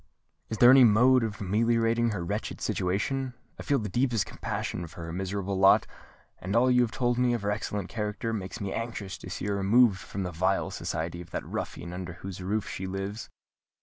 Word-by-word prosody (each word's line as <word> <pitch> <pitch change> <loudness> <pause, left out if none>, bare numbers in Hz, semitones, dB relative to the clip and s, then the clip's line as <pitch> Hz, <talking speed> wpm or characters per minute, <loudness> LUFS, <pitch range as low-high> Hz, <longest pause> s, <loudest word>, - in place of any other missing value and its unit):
Is 110 - -3
there 120 +2 +8
any 135 -1 +8
mode 125 +3 +6
of 110 -2 -4
ameliorating 115 +3 +2
her 95 -6 -3
wretched - - -3
situation? 125 +8 -1 0.2
I - - -4
feel 140 - +1
the 110 - -3
deepest 120 0 +1
compassion 85 - -4
for 85 +1 -10
her 80 - -6
miserable 95 +1 -2
lot; 95 0 +6 0.5
and 95 +4 -3
all 125 +2 +4
you 125 0 +5
have 120 - +2
told 120 +1 0
me 125 -1 +3
of 115 - -5
her 100 - 0
excellent 105 -2 -3
character 105 +2 -3
makes 95 -4 -5
me 100 -2 -3
anxious 115 -4 -4
to - - -9
see - - -5
her 100 0 0
removed 100 +1 +4
from 100 - -5
the 90 - -3
vile 95 +4 0
society 85 +2 -4
of 85 - -12
that - - -4
ruffian 85 - -5
under 90 -2 -5
whose 95 +1 -8
roof 100 +3 -1
she 95 - -5
lives." 95 +3 -5
105 Hz, 205 wpm, -28 LUFS, 95-115 Hz, 0.5 s, there